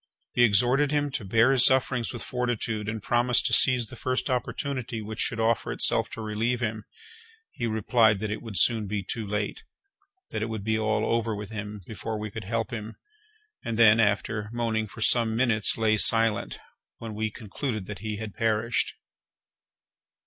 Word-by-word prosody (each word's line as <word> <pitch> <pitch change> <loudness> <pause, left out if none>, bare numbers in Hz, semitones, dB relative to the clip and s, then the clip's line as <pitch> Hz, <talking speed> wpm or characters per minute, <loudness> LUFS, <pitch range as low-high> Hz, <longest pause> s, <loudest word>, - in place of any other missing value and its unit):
We 120 - +3
exhorted 125 +6 +4
him 145 -1 0
to 125 - -3
bear 115 +6 +3
his 130 -3 +4
sufferings 130 -2 +2
with 120 - -6
fortitude, 115 -4 -2
and 110 -1 -5
promised 120 0 +2
to - - +1
seize 125 -2 +5
the - - -10
first 130 +1 -2
opportunity 125 -1 -3
which 110 +1 -7
should 115 - 0
offer 115 0 +1
itself 115 +1 +2
to 115 - -6
relieve 110 +3 -1
him. 110 -2 -3 0.7
He 120 - -3
replied 110 0 +3
that 105 +1 -4
it 105 - -4
would 110 -5 -6
soon 110 +4 +3
be 100 0 -3
too 110 +3 -4
late; 105 0 -3 0.7
that - - -3
it 110 - -2
would 110 -3 -5
be 110 +1 0
all 110 0 0
over 115 -1 0
with 105 +1 -7
him 105 -2 -6
before 110 +1 -5
we 105 -1 -5
could - - -7
help 115 +1 -2
him; 110 -1 -6 0.7
and 115 -1 -3
then, 115 -1 +6
after 105 0 0
moaning 115 -2 -1
for 110 - -11
some 115 -1 +4
minutes, 115 -3 +3
lay 110 -1 +2
silent, 115 0 +2 0.4
when 115 -1 -7
we 110 +1 -2
concluded 110 0 -5
that 105 +1 -8
he 110 -1 -4
had 110 -2 -6
perished. 115 +1 0
110 Hz, 180 wpm, -26 LUFS, 105-120 Hz, 0.7 s, then